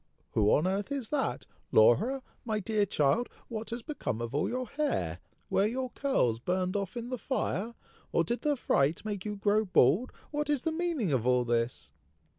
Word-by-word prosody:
who 105 Hz, -1 st, +3 dB
on 150 Hz, -, +3 dB
earth 195 Hz, +6 st, -1 dB
is 270 Hz, -6 st, -3 dB
that! 290 Hz, -3 st, -1 dB, 0.3 s
Laura! 225 Hz, -, +4 dB, 0.2 s
my 220 Hz, -3 st, -1 dB
dear 210 Hz, 0 st, +1 dB
child! 180 Hz, -, +2 dB, 0.2 s
what 225 Hz, -2 st, -5 dB
has 235 Hz, 0 st, -5 dB
become 285 Hz, -, -3 dB
of 120 Hz, +1 st, -4 dB
all 145 Hz, -, +1 dB
your 255 Hz, 0 st, -2 dB
hair? 295 Hz, +5 st, -1 dB, 0.3 s
Were 200 Hz, -, +2 dB
your 255 Hz, +2 st, -3 dB
curls 125 Hz, -, +1 dB
burned 185 Hz, -, -1 dB
off 200 Hz, +1 st, -2 dB
in 240 Hz, 0 st, -4 dB
the 255 Hz, -, -2 dB
fire? 235 Hz, -4 st, -2 dB, 0.4 s
or 170 Hz, -, +3 dB
did 235 Hz, +9 st, -2 dB
the 295 Hz, -1 st, +2 dB
fright 155 Hz, -, +1 dB
make 205 Hz, -2 st, -4 dB
you 210 Hz, -1 st, -3 dB
grow 205 Hz, +2 st, +2 dB
bald? 180 Hz, -, +3 dB, 0.2 s
What 295 Hz, 0 st, -2 dB
is 290 Hz, -4 st, +1 dB
the 325 Hz, -, 0 dB
meaning 320 Hz, -, -1 dB
of 125 Hz, -2 st, +1 dB
all 125 Hz, -1 st, +3 dB
this?" 115 Hz, -, -1 dB
210 Hz, 190 wpm, -30 LUFS, -, 0.4 s, Laura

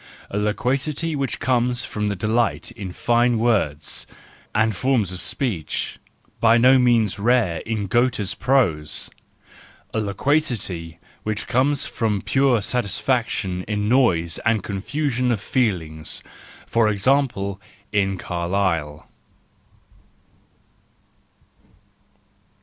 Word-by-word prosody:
A 100 Hz, -, -2 dB
loquacity 135 Hz, +9 st, -1 dB
which 140 Hz, -2 st, -2 dB
comes 125 Hz, -1 st, +1 dB
from 105 Hz, -1 st, -2 dB
delight 110 Hz, +4 st, 0 dB
in 95 Hz, -3 st, -7 dB
fine 120 Hz, +4 st, +2 dB
words 75 Hz, -, 0 dB, 0.5 s
and 110 Hz, -1 st, +2 dB
forms 110 Hz, -1 st, +1 dB
of 90 Hz, -, -6 dB
speech: 105 Hz, -, -2 dB, 0.4 s
by 115 Hz, 0 st, +5 dB
no 130 Hz, +2 st, +6 dB
means 115 Hz, -5 st, +2 dB
rare 110 Hz, -6 st, +2 dB
in 110 Hz, -2 st, -1 dB
Goethe's 120 Hz, -1 st, +1 dB
prose. 85 Hz, -, +1 dB, 0.8 s
A 110 Hz, -, 0 dB
loquacity 100 Hz, -, -1 dB, 0.2 s
which 110 Hz, -2 st, -3 dB
comes 140 Hz, +3 st, +2 dB
from 105 Hz, -5 st, -1 dB
pure 135 Hz, -5 st, +2 dB
satisfaction 110 Hz, -4 st, 0 dB
in 105 Hz, -1 st, -1 dB
noise 90 Hz, -10 st, +2 dB
and 110 Hz, -3 st, +1 dB
confusion 125 Hz, +5 st, -1 dB
of 115 Hz, -, 0 dB
feelings: 85 Hz, -10 st, -2 dB, 0.4 s
for 115 Hz, -2 st, +2 dB
example 100 Hz, -3 st, +1 dB, 0.3 s
in 95 Hz, -2 st, +1 dB
Carlyle. 85 Hz, -4 st, -2 dB
110 Hz, 100 wpm, -22 LUFS, 95-125 Hz, 0.8 s, no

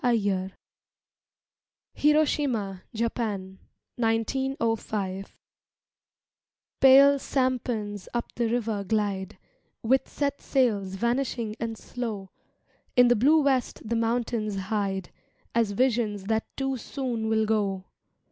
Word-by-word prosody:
MAYA 200 Hz, -6 st, +1 dB, 1.4 s
(HIROSHIMA, 280 Hz, -10 st, +1 dB
JAPAN, 215 Hz, -4 st, -3 dB, 0.4 s
1905) 225 Hz, -4 st, -1 dB, 1.4 s
Pale 275 Hz, +1 st, +7 dB
sampans 240 Hz, -7 st, -1 dB
up 240 Hz, -1 st, -3 dB
the 235 Hz, -1 st, 0 dB
river 225 Hz, -3 st, -1 dB
glide, 200 Hz, -2 st, -1 dB, 0.5 s
With 260 Hz, +4 st, +2 dB
set 285 Hz, -1 st, -2 dB
sails 205 Hz, -8 st, +1 dB
vanishing 235 Hz, 0 st, -1 dB
and 225 Hz, -1 st, -3 dB
slow; 215 Hz, -7 st, -5 dB, 0.6 s
In 245 Hz, -1 st, +6 dB
the 245 Hz, -, +5 dB
blue 295 Hz, +7 st, +4 dB
west 260 Hz, -5 st, 0 dB
the 230 Hz, -, 0 dB
mountains 230 Hz, -2 st, 0 dB
hide, 195 Hz, -1 st, -2 dB, 0.4 s
As 230 Hz, -2 st, +2 dB
visions 220 Hz, -4 st, +1 dB
that 220 Hz, +2 st, -1 dB
too 270 Hz, -1 st, -1 dB
soon 240 Hz, -2 st, -3 dB
will 220 Hz, 0 st, +2 dB
go. 200 Hz, -3 st, 0 dB
225 Hz, 100 wpm, -27 LUFS, 205-255 Hz, 1.4 s, Pale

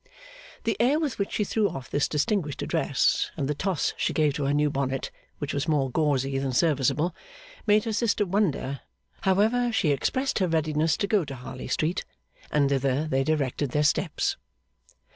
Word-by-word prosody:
The 225 Hz, -2 st, 0 dB
air 265 Hz, +6 st, +3 dB
with 290 Hz, -9 st, -2 dB
which 200 Hz, -, -2 dB
she 210 Hz, -, +1 dB
threw 210 Hz, 0 st, +1 dB
off 135 Hz, -6 st, -8 dB
this 145 Hz, -, +1 dB
distinguished 155 Hz, -, -1 dB
address -, -, +1 dB
and 135 Hz, -, -1 dB
the 150 Hz, -, 0 dB
toss 185 Hz, +3 st, -1 dB
she -, -, 0 dB
gave 150 Hz, -2 st, +2 dB
to 140 Hz, 0 st, -2 dB
her 140 Hz, -, +1 dB
new 150 Hz, 0 st, +2 dB
bonnet 135 Hz, -1 st, -2 dB, 0.3 s
(which 145 Hz, -1 st, -4 dB
was 140 Hz, +2 st, -1 dB
more 140 Hz, -4 st, +1 dB
gauzy 135 Hz, -2 st, +1 dB
than 135 Hz, -1 st, -2 dB
serviceable), 150 Hz, +2 st, +2 dB, 0.5 s
made 210 Hz, 0 st, +5 dB
her 225 Hz, -, -2 dB
sister 215 Hz, -2 st, +1 dB
wonder; 175 Hz, -8 st, 0 dB, 0.4 s
however, 220 Hz, +6 st, +2 dB
she 200 Hz, -9 st, +2 dB
expressed 260 Hz, -, 0 dB
her 185 Hz, -, +2 dB
readiness 155 Hz, -1 st, +1 dB
to 210 Hz, -, 0 dB
go 200 Hz, -2 st, +2 dB
to 135 Hz, -3 st, -7 dB
Harley 130 Hz, +1 st, -8 dB
Street, 165 Hz, +4 st, 0 dB, 0.5 s
and 145 Hz, -2 st, +2 dB
thither 135 Hz, +1 st, +1 dB
they 135 Hz, -3 st, +1 dB
directed 145 Hz, -2 st, 0 dB
their 150 Hz, -, +2 dB
steps. 150 Hz, -, +1 dB
155 Hz, 180 wpm, -26 LUFS, 140-200 Hz, 0.5 s, made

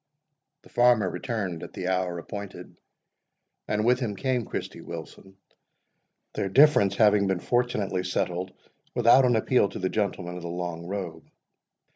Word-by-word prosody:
The -, -, -18 dB
farmer 120 Hz, -4 st, +4 dB
returned 90 Hz, -1 st, -3 dB
at -, -, -9 dB
the 90 Hz, -, -4 dB
hour 90 Hz, -2 st, -1 dB
appointed, 100 Hz, 0 st, -8 dB, 0.9 s
and 105 Hz, +1 st, 0 dB
with 125 Hz, +1 st, +3 dB
him 110 Hz, -6 st, -3 dB
came 125 Hz, +1 st, -1 dB
Christy -, -, -5 dB
Wilson, 95 Hz, 0 st, -10 dB, 1.0 s
their 95 Hz, -, -2 dB
difference 100 Hz, -5 st, +5 dB
having 105 Hz, -2 st, +4 dB
been 95 Hz, -2 st, 0 dB
fortunately 105 Hz, -5 st, 0 dB
settled 90 Hz, 0 st, -2 dB, 0.4 s
without 120 Hz, +2 st, +6 dB
an 120 Hz, -1 st, +3 dB
appeal 110 Hz, -1 st, +2 dB
to -, -, -8 dB
the 95 Hz, -, -1 dB
gentlemen 90 Hz, -4 st, -2 dB
of -, -, -7 dB
the 85 Hz, -, -6 dB
long 85 Hz, -1 st, -5 dB
robe. 90 Hz, -5 st, -6 dB
100 Hz, 145 wpm, -26 LUFS, 90-115 Hz, 1.0 s, without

